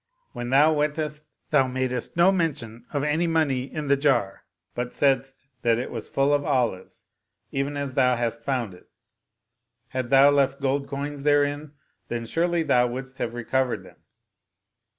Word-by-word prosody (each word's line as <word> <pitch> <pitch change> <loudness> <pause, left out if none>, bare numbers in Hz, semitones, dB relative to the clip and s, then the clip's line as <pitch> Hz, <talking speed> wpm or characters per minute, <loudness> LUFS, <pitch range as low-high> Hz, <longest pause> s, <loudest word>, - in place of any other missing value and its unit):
When 120 0 -5
thou 145 +4 +5
wentest 150 0 -2 0.2
thou 135 -4 +4
madest 130 +3 -3
no 175 +3 +6
mention 135 - -2
of 145 -2 -1
any 155 +3 +1
money 140 -6 0
in 155 -2 -4
the 140 - +4
jar, 135 -9 0 0.3
but 125 0 -4
saidst 135 -1 0 0.2
that 115 -2 +2
it 125 - -4
was 115 -3 -6
full 135 +1 +2
of 145 0 +2
olives, 125 -10 -2 0.5
even 140 +1 -2
as 140 -2 -3
thou 125 0 +3
hast 115 -1 -2
found 120 -6 -2
it. 90 - -18 1.0
Hadst 130 -2 -3
thou 135 +2 +7
left 140 -1 +2
gold 140 0 -1
coins 140 +1 -5
therein, 145 0 +1 0.3
then 120 -1 -4
surely 170 +6 0
thou 125 -5 +3
wouldst 130 +2 -7
have 120 0 -3
recovered 120 -3 -1
them." - - -16
135 Hz, 160 wpm, -25 LUFS, 125-145 Hz, 1.0 s, thou